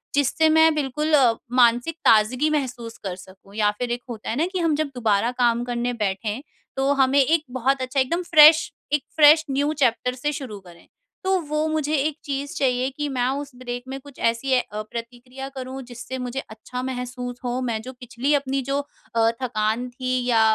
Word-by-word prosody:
जिससे 290 +3 +3
मैं 320 0 +5
बिल्कुल 300 +2 -1
अ, 255 -6 +6 0.2
मानसिक 245 +5 +3
ताज़गी 245 +7 +4
महसूस 245 -6 -3
कर 185 -2 -3
सकूँ 190 +2 -16
या 210 -1 +2
फिर 245 -1 -2
एक 245 +1 -2
होता 220 -2 -6
है 225 - -1
ना 325 - +2
कि 370 - -1
हम 325 -3 +2
जब 310 -1 0
दोबारा 225 0 +1
काम 235 0 +2
करने 245 0 -2
बैठे 210 +5 -3 0.4
तो 270 +1 +2
हमें 270 +2 +3
एक 315 +3 +2 0.2
बहुत 265 +2 +1
अच्छा 255 +2 -1
एकदम 335 +8 +1
फ्रेश 310 -1 +7 0.2
एक 295 - +2
फ्रेश 310 +1 +7
न्यू 285 +3 +1
चैप्टर 250 0 +2
से 295 +4 -2
शुरू 250 -9 -6
करें। 175 -3 -17 0.4
तो 380 0 +2
वो 305 +1 0
मुझे 310 -1 0
एक 300 +2 0
चीज़ 280 0 -4
चाहिए 255 -1 +1
कि 295 0 -1
मैं 250 -2 0
उस 285 -1 -7
ब्रेक 245 -1 -6
में 270 +1 -5
कुछ 285 -1 -15
ऐसी 230 +4 0
अ, 210 -2 -5
प्रतिक्रिया 250 +3 -7
करूँ 260 +1 -6
जिससे 245 +1 -7
मुझे 250 +1 -4
अच्छा 250 +2 -7
महसूस 250 -1 -5
हो। 245 +1 -2
मैं 230 -3 -2
जो 260 +3 -9
पिछली 250 +3 -2
अपनी 275 -1 0
जो 280 +1 +1 0.4
अ, 225 0 +4
थकान 230 0 -1
थी 255 0 -2
या 230 -3 +3
255 Hz, 195 wpm, -23 LUFS, 240-285 Hz, 0.4 s, फ्रेश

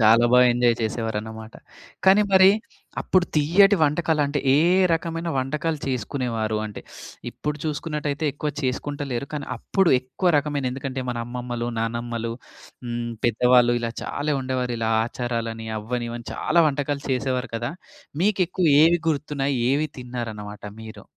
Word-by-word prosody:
చాలా 115 +2 +6
బాగా 125 0 +7
ఎంజాయ్ 120 -1 +3
చేసేవారన్నమాట. 110 0 -4 0.5
కానీ, 195 +2 +6
మరి 190 0 +8 0.5
అప్పుడు 185 -1 +2
తియ్యటి 190 +7 +5
వంటకాలంటే, 150 -1 +1 0.2
ఏ - - +5 0.3
రకమైన 165 +1 -2
వంటకాలు 150 +4 -1
చేసుకునేవారు? 115 -4 -2
అంటే, 105 - -8 0.5
ఇప్పుడు 150 0 -4
చూసుకున్నట్టయితే 150 -1 -3
ఎక్కువ 150 +1 -3
చేసుకుంటలేరు. 140 0 -3
కానీ, 145 -1 -4
అప్పుడు 190 - +1
ఎక్కువ 175 +8 0
రకమైన 145 -3 -1
ఎందుకంటే 130 0 -4
మన 120 -1 -2
అమ్మమ్మలు, 120 -1 -4
నానమ్మలు 115 0 -3 0.5
హ్మ్, 120 0 -3 0.2
పెద్దవాళ్ళు, 120 +1 +4
ఇలా 115 -1 -2
చాలా 145 +1 -2
ఉండేవారిలా 125 -3 -2 0.2
ఆచారాలని, 115 -2 -4
అవని 120 +2 -3
ఇవని 120 0 -7
చాలా 170 +1 +3
వంటకాలు 145 0 -2
చేసేవారు 130 0 -1
కదా! 120 +4 -3 0.5
మీకెక్కువ 185 -3 +1 0.2
ఏవి 170 +1 +4
గుర్తున్నాయి 140 -3 -1
ఏవి 150 +2 +1
తిన్నారన్నమాట 110 -5 -6 0.2
మీరు? 110 0 -10
130 Hz, 125 wpm, -24 LUFS, 120-150 Hz, 0.5 s, మరి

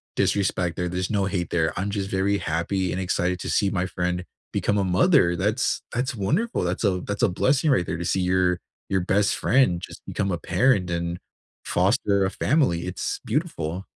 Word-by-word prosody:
disrespect 90 -4 +1
there, 90 0 -2
there's 90 +1 -2
no 100 -3 +1
hate 90 -3 -2
there, 80 -2 +1
I'm 95 +3 -1
just 100 -1 -3
very 100 +1 +1
happy 90 +3 -1
and 95 - -2
excited 90 0 0
to - - -5
see 100 - +2
my 95 -2 0
friend 90 +1 -2 0.3
become 105 - 0
a 100 - +2
mother, 95 - +4
that's 105 +8 0
that's 130 +4 -1
wonderful, 200 - 0
that's - - -2
a 95 -4 +1
that's 100 +3 -3
a 115 - +5
blessing 135 - +2
right 90 -9 +2
there 85 - -3
to 85 - -4
see 95 - +1
your 90 -1 +2 0.3
your 95 -2 +1
best 100 +3 +2
friend 115 -10 +2
just - - -9
become 100 -2 -2
a 85 - -1
parent 105 -8 +2
and 85 0 -2 0.5
foster 100 +1 +2
a - - +1
family, 105 - +1
it's 90 - -3
beautiful. 95 - -2
95 Hz, 195 wpm, -24 LUFS, 90-105 Hz, 0.5 s, a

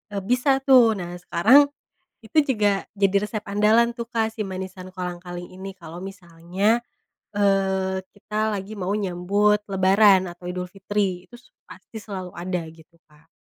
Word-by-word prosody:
eee, 200 - -2
bisa, 265 +4 +1
tuh. 245 -5 +6
Nah, 175 -2 -6
sekarang 240 +12 +5 0.6
itu 220 +8 -1
juga 210 -8 +1 0.2
jadi 195 -1 +2
resep 210 0 -4
andalan, 215 +4 +3
tuh, 235 -1 -7
Kak, 225 -1 -1
si 215 - -3
manisan 185 -1 -7
kolang-kaling 180 0 -7
ini, 190 +1 -7
kalau 170 +1 -9
misalnya, 190 +4 -1 0.5
eee, 190 -1 +1
kita 215 +1 -3
lagi 195 +2 -7
mau 200 0 -2
nyambut 205 +2 +1
lebaran 190 -1 +4
atau 175 0 -10
Idulfitri, 185 0 -3
itu 240 - -13
s 245 - -23 0.2
pasti 215 +3 -11
selalu 190 -4 -7
ada, 175 -1 -4
gitu, 165 +1 -20
Kak. 155 +1 -25
195 Hz, 150 wpm, -23 LUFS, 180-215 Hz, 0.6 s, tuh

